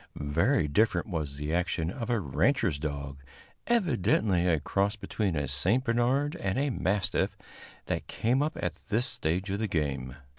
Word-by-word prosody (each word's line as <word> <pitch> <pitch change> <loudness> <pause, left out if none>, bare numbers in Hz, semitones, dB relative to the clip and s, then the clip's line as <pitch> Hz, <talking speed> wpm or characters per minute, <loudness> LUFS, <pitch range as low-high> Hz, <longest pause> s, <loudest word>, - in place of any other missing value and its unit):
Very 80 - +1
different 95 +2 +2
was 75 -6 -2
the 75 +2 -3
action 85 -1 0
of 115 +1 -5
a 120 -2 +2
rancher's 95 - +1
dog, 70 -2 -4 0.5
evidently 105 - +2
a 80 -3 +3
cross 100 +7 0
between 100 -3 -2
a 70 -1 -1
St. 90 - +1
Bernard 130 +5 +1
and 95 +2 -1
a 140 +1 +1
mastiff, 100 -4 0 0.5
that - - -3
came 125 +5 +1
up 150 +1 -1
at - - -3
this 115 +3 +2
stage 95 -4 -1
of 100 - -1
the 110 - 0
game. 70 -7 -2
95 Hz, 160 wpm, -29 LUFS, 75-115 Hz, 0.5 s, a